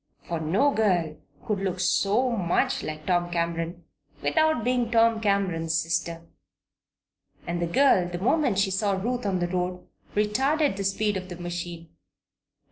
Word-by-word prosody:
For 170 -1 -3
no 190 - +2
girl 180 - +1 0.3
could 210 -2 -1
look 185 -2 -2
so 205 +7 +2
much 185 -7 0
like 155 0 -6
Tom 175 0 +1
Cameron 170 0 -2 0.4
without 315 -6 +2
being 245 -1 +1
Tom 230 -1 +3
Cameron's 185 -6 0
sister. 165 0 -2 1.2
And 170 0 -3
the 170 - 0
girl, 185 -2 +4
the 175 - -4
moment 245 - +1
she 195 -1 +2
saw 200 +1 +1
Ruth 235 +4 -2
on 190 -2 0
the 175 -1 -1
road, 180 0 -3 0.3
retarded 265 +7 +1
the 195 - -4
speed 205 +1 0
of 185 0 -7
the 175 - -6
machine. 175 -1 -6
190 Hz, 150 wpm, -26 LUFS, 175-220 Hz, 1.2 s, girl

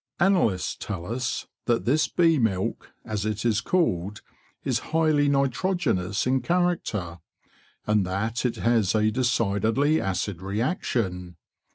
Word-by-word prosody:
Analysts 175 - +2
tell 95 -5 -5
us 125 +4 -3 0.2
that 120 -2 +1
this 145 +6 +2
bee 165 -3 +3
milk, 95 -5 -1 0.2
as 105 -2 -3
it 110 +1 -2
is 110 -3 +2
called, 105 - 0 0.4
is - - 0
highly 155 -3 +3
nitrogenous 140 - 0
in 130 +1 +2
character, 125 - -1 0.7
and 105 -1 +2
that 110 +5 -2
it 125 -2 0
has 115 -4 +2
a 110 0 +3
decidedly 120 +4 +1
acid 95 -1 -2
reaction. 95 - -2
115 Hz, 125 wpm, -25 LUFS, 100-140 Hz, 0.7 s, bee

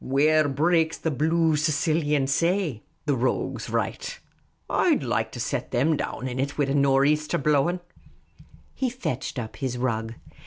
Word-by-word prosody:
Where 150 +3 +3
breaks 160 +3 +2
the 160 - -2
blue 160 +3 +2
Sicilian 150 -1 +1
say,' 165 - 0 0.2
the 145 -2 +2
rogues 130 +1 -1
write. - - -3 0.5
I'd - - +2
like - - -1
to - - -6
set - - -2
them 150 +6 +2
down 130 -2 -4
in 125 0 -4
it, 140 +1 -2
wid 145 -2 +1
a - - +1
nor' 140 -1 +4
easter 150 +1 +1
blowing! 150 +5 +1 0.5
" - - -24
He 260 - -1
fetched 235 - -4
up 110 -3 -5
his 130 -3 -3
rug. 115 -2 -2
145 Hz, 160 wpm, -25 LUFS, 135-160 Hz, 0.5 s, nor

